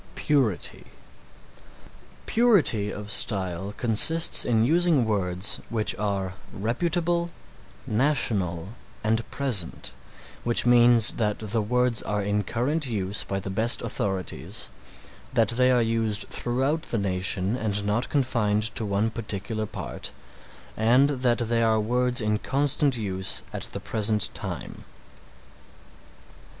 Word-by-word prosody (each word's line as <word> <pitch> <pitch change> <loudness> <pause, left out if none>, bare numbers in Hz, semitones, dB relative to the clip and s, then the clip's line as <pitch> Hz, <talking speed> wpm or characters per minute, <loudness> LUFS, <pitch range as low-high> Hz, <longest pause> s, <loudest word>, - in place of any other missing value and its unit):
PURITY 135 - 0 1.4
Purity 180 - +3
of 105 0 -7
style 95 -3 +2
consists 160 +9 +2
in 115 -2 +2
using 165 -3 +3
words 95 -3 0
which 110 -2 0
are 100 -3 -2 0.2
reputable, 170 - -1 0.6
national 105 - 0 0.3
and 110 +1 0
present, 120 -12 -2 0.5
which 120 0 +3
means 120 -1 +5
that 105 -2 -1
the 110 +1 -2
words 125 +1 +1
are 105 -1 -2
in 105 +1 0
current 130 - -1
use 100 -3 +1
by 95 - -3
the 95 0 -6
best 110 +5 +4
authorities, 95 - -3 0.6
that 115 -2 +3
they 125 +2 +3
are 125 -2 +3
used 115 -2 0
throughout 135 +6 -1
the 120 - -3
nation 95 +1 0
and 105 -4 -2
not 110 +4 -1
confined 115 -5 0
to - - -3
one 105 +2 0
particular 110 -1 -4
part, - - -5 0.6
and 125 +6 +4
that 125 -3 +1
they 115 0 0
are 110 -1 +2
words 125 +3 0
in 105 0 0
constant 140 0 +1
use 95 -3 0
at - - -4
the - - -5
present 105 -1 0
time. - - -7
110 Hz, 120 wpm, -25 LUFS, 105-125 Hz, 1.4 s, means